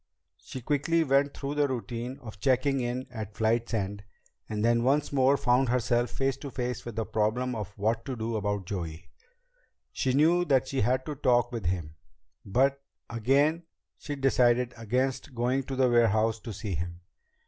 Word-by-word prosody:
She 130 - -8
quickly 155 +5 +1
went 140 0 +2
through 140 0 -3
the 145 -1 +2
routine 125 0 -4
of 110 -3 -9
checking 135 +3 +2
in 125 +1 -2
at 110 -4 -7
flight's 115 +1 +1
end, 100 -1 -3 0.5
and 105 0 -1
then 115 0 +3
once 140 +4 +1
more 135 +1 +4
found 125 0 +2
herself 120 0 +1
face 135 -1 -1
to 140 - -7
face 125 -2 -3
with 120 -2 -6
the 110 -1 -1
problem 115 +5 0
of 105 -4 -4
what 110 +3 0
to 130 - -3
do 115 0 -3
about 100 -2 -1
Joey. 85 -4 -6 0.8
She 130 - 0
knew 165 +5 +4
that 135 -7 +2
she 135 - -1
had 130 +4 +1
to 150 - -3
talk 120 -3 +2
with 115 -8 -3
him, 85 -3 -3 0.5
but 135 +7 +1 0.3
again 140 +8 +2 0.4
she 145 - -5
decided 125 -3 +2
against 125 +4 -2
going 125 +3 +1
to 135 - -4
the 130 -1 +3
warehouse 115 -2 +3
to 110 - -7
see 100 -1 -5
him. 85 +2 -4
120 Hz, 175 wpm, -28 LUFS, 110-135 Hz, 0.8 s, more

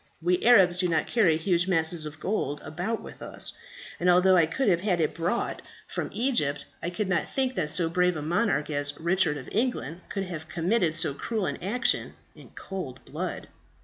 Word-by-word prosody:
We 175 +2 +1
Arabs 190 -7 +6
do 180 - +2
not 160 -2 +1
carry 185 -9 +3
huge 175 +1 +1
masses 160 -3 +1
of 150 +1 -10
gold 185 -7 -2
about 180 +8 -3
with - - -11
us; - - -5 0.5
and 180 - +2
although 180 +1 +6
I 165 -3 +5
could 250 +10 -1
have 175 -3 +3
had 185 -4 +1
it 155 - +1
brought 175 +8 -2 0.3
from - - -3
Egypt, 215 - +1 0.2
I 170 - -2
did 180 +3 -2
not 180 -2 0
think 260 -1 0
that 165 -10 -1
so 170 +1 +2
brave 180 +1 +2
a 150 - -4
monarch 170 -2 0
as 145 0 -1
Richard 170 -2 +2
of 130 - -9
England 205 - -1
could 195 - -2
have 165 -4 -7
committed 175 -1 +1
so 160 -4 +1
cruel 215 +7 -2
an - - -4
action 240 +8 0 0.2
in - - -15
cold 180 -10 -7
blood. - - -5
175 Hz, 195 wpm, -27 LUFS, 160-195 Hz, 0.5 s, Arabs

